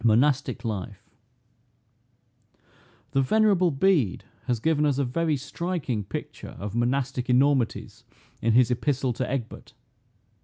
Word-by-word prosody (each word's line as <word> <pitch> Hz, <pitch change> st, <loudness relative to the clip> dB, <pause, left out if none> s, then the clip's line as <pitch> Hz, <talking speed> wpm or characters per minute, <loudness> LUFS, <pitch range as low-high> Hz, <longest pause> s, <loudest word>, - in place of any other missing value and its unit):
MONASTIC 130 Hz, +4 st, +2 dB
LIFE. 105 Hz, 0 st, -5 dB, 2.0 s
The 135 Hz, -1 st, +2 dB
venerable 195 Hz, +3 st, +3 dB
Bede 145 Hz, -, +1 dB, 0.2 s
has 120 Hz, -2 st, 0 dB
given 150 Hz, +4 st, +1 dB
us 145 Hz, -3 st, +2 dB
a 140 Hz, -, +1 dB
very 155 Hz, +4 st, 0 dB
striking 140 Hz, -, -3 dB
picture -, -, -7 dB
of 100 Hz, 0 st, -6 dB
Monastic 125 Hz, +2 st, -1 dB
enormities, 130 Hz, -1 st, +1 dB, 0.4 s
in 115 Hz, 0 st, +2 dB
his 125 Hz, 0 st, +4 dB
epistle 130 Hz, 0 st, 0 dB
to 125 Hz, +2 st, -3 dB
Egbert. 125 Hz, -4 st, -5 dB
130 Hz, 115 wpm, -26 LUFS, 120-150 Hz, 2.0 s, his